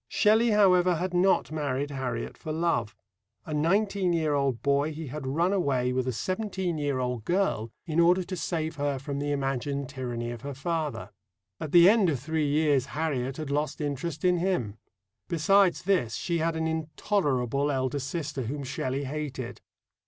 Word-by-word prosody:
Shelley, 220 +2 +3
however, 185 -4 +4
had 180 +2 -2
not 180 -2 +3
married 145 -2 -2
Harriet 125 -4 -3
for 155 - -6
love. 155 -9 0 0.5
A 155 - -5
nineteen 190 +4 +1
year 160 -3 +1
old 140 -4 0
boy, 140 +2 +2
he 155 +1 -6
had 135 0 -5
run 170 +8 +1
away 130 -9 +1
with 130 0 -1
a - - +1
seventeen 185 - -2
year 145 -2 0
old 125 -3 -2
girl 175 - 0
in 160 0 -1
order 175 +2 +5
to 185 +1 -5
save 160 -1 -3
her 145 -1 0
from 140 +1 -4
the 145 0 -1
imagined 140 0 -2
tyranny 120 -3 -4
of 120 - -7
her 140 0 -6
father. 150 - -3 0.5
At 155 - -5
the 175 0 +8
end 205 -3 +5
of 140 -5 -1
three 155 +2 -1
years 145 -3 +2
Harriet 135 -5 -1
had 155 -3 -4
lost 150 0 -1
interest 150 +2 -3
in 180 -1 +4
him. 170 - -1 0.5
Besides 185 +2 +3
this, 175 - +1
she 170 -2 -1
had 165 +1 0
an 160 0 -1
intolerable 150 - 0
elder 130 +1 -1
sister 145 0 -4
whom 140 +4 -4
Shelley 130 +1 -2
hated. 135 -3 -5
150 Hz, 175 wpm, -28 LUFS, 135-170 Hz, 0.5 s, the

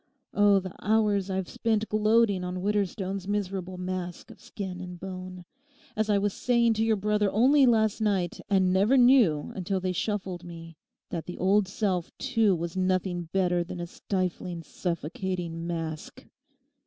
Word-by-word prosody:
Oh, 205 -1 +5
the 185 -1 -7
hours 210 -2 +2
I've 190 -1 -2
spent 220 -2 -1
gloating 215 -2 +3
on 180 0 -4
Widderstone's 195 -2 -1
miserable 190 -3 -3
mask 180 -1 -5
of - - -16
skin 185 -3 -6
and 180 -1 -8
bone, 185 -1 -7 0.5
as 215 0 0
I 205 - +4
was 200 0 0
saying 235 -2 +2
to 220 0 0
your 225 -1 +3
brother 210 0 +1
only 265 +5 +5
last 220 -2 +2
night, 195 -5 0
and 190 -2 +3
never 205 +8 +4
knew 240 - +4
until 190 +1 -2
they 185 0 -1
shuffled 185 -2 -3
me 165 -1 -10 0.4
that 170 -3 -4
the 180 - -6
old 195 +2 +3
self 190 -3 -1
too 225 -7 +2
was 170 +1 -4
nothing 185 -2 -1
better 180 -2 +1
than 175 +1 -7
a 175 - -3
stifling 180 -1 -3
suffocating 170 +1 -4
mask. 165 -2 -5
190 Hz, 155 wpm, -27 LUFS, 180-210 Hz, 0.5 s, Oh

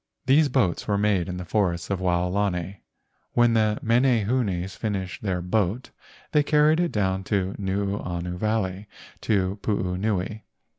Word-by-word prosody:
These 145 +3 +4
boats 120 -10 0
were 100 -1 +1
made 100 -3 +1
in 90 - -4
the 90 - -6
forests 85 -2 0
of 95 - 0
Wao¬ 90 -1 +1
lani. 95 -2 -2 0.5
When 120 -1 +4
the 110 -1 +2
menehunes 115 -6 +1
finished 95 -4 -3
their 90 -4 -2
boat 105 +5 -1 0.4
they 150 - +4
carried 150 +2 +3
it 175 -1 +1
down 95 -2 0
Nuuanu 95 -2 -2
Valley 100 0 -1 0.3
to 100 -1 0
Puunui. 100 +1 -1
100 Hz, 135 wpm, -25 LUFS, 90-110 Hz, 0.5 s, These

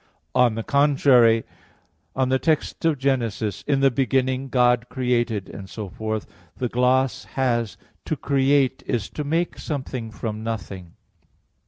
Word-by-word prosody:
On 125 -3 +4
the 115 - -3
contrary, 135 -5 +4 0.7
On 130 -1 +1
the 130 0 +2
text 155 0 0
of 160 -3 +3
Gen. 135 0 +2
1, 115 -2 -2 0.4
"In 140 -2 +2
the 135 -1 +5
beginning 130 +1 0
God 125 -1 +2
created," 120 -5 -1
etc., 105 +2 -5 0.4
the 125 - -2
gloss 125 +2 +1
has, 120 -5 0 0.3
"To - - -1
create 135 -1 +2
is 115 -6 -2
to 150 - -4
make 165 +4 -1
something 130 -5 -4
from 110 0 -5
nothing." 100 -6 -6
125 Hz, 135 wpm, -23 LUFS, 115-135 Hz, 0.7 s, the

